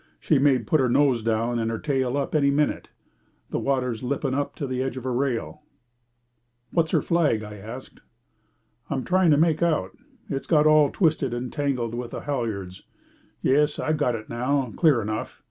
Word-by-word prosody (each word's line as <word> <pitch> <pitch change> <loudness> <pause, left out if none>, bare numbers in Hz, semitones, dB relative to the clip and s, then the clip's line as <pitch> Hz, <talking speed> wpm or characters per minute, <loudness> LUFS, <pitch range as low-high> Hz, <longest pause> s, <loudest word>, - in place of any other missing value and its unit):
"She 150 - +2
may 140 -1 +4
put 125 +6 0
her 130 -2 +2
nose 130 -2 +3
down 115 +2 0
and 115 0 -1
her 115 - -2
tail 135 -1 -1
up 140 - -2
any 145 -3 +3
minute. 145 +1 0 0.6
The - - -1
water's 125 -4 -1
lipping 135 +1 -2
up 145 +1 -2
to 145 - -4
the 130 -1 -2
edge 130 -1 -3
of 130 - -6
her 130 -1 -2
rail." 130 +3 -2 1.1
"What's 165 -2 +1
her - - +1
flag?" 155 -11 +1
I 105 0 -9
asked. 115 +6 -10 0.9
"I'm 135 -2 -2
trying 185 -1 +3
to 145 - +5
make 160 0 +2
out. 155 - 0 0.3
It's 135 - -4
got 150 -3 +4
all 155 -2 +5
twisted 150 - +1
and 120 0 -5
tangled 130 -6 -1
with 120 0 -4
the - - -6
halyards. 110 -10 -4 0.6
Yes, 150 +2 +2
I've 155 0 0
got 125 -5 +1
it 110 -1 -7
now, 125 +1 -1
clear 145 - +3
enough. 110 +1 -4
135 Hz, 185 wpm, -25 LUFS, 120-150 Hz, 1.1 s, to